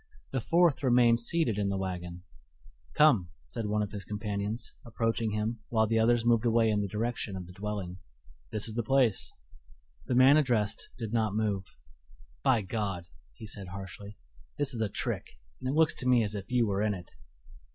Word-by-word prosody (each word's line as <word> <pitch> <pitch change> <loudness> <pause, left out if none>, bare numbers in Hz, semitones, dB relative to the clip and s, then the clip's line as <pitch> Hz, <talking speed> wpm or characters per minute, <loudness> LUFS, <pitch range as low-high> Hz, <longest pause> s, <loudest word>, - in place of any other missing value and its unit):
The 130 - -1
fourth 170 +3 +3
remained 120 -3 +4
seated 120 -4 +1
in 100 -1 0
the 100 - -1
wagon. 90 -2 -5 0.7
"Come," 115 - +5 0.2
said 115 -3 -4
one 105 0 +1
of 100 - -5
his 100 -2 -6
companions, 105 +2 -4
approaching 115 -1 -1
him, 110 +2 -2
while 110 -2 +3
the 115 +1 +1
others 115 +1 +3
moved 115 -2 +4
away 115 -1 +3
in 105 -1 +1
the 100 - -1
direction 110 0 -3
of 90 -1 -6
the 90 - -12
dwelling 100 -2 -5 0.5
"this 110 - 0
is 110 - -5
the 120 - 0
place." 125 -2 +2 0.8
The 125 - 0
man 130 +4 +7
addressed 120 -8 0
did 115 -3 -5
not 110 -3 +1
move. 105 -3 0 0.8
"By 110 - +3
God!" 95 -4 -3 0.3
he 110 - -10
said 100 -2 -7
harshly, 100 +2 -8 0.4
"this 145 -2 +2
is 115 - -3
a 110 - 0
trick, - - -4 0.2
and 130 - -2
it 140 - -1
looks 160 -1 +4
to 125 - -2
me 125 -2 +5
as 105 -1 -2
if 100 0 -6
you 125 -2 +3
were 100 -1 0
in 105 -1 +1
it." 90 -2 -10
110 Hz, 190 wpm, -30 LUFS, 100-120 Hz, 0.8 s, man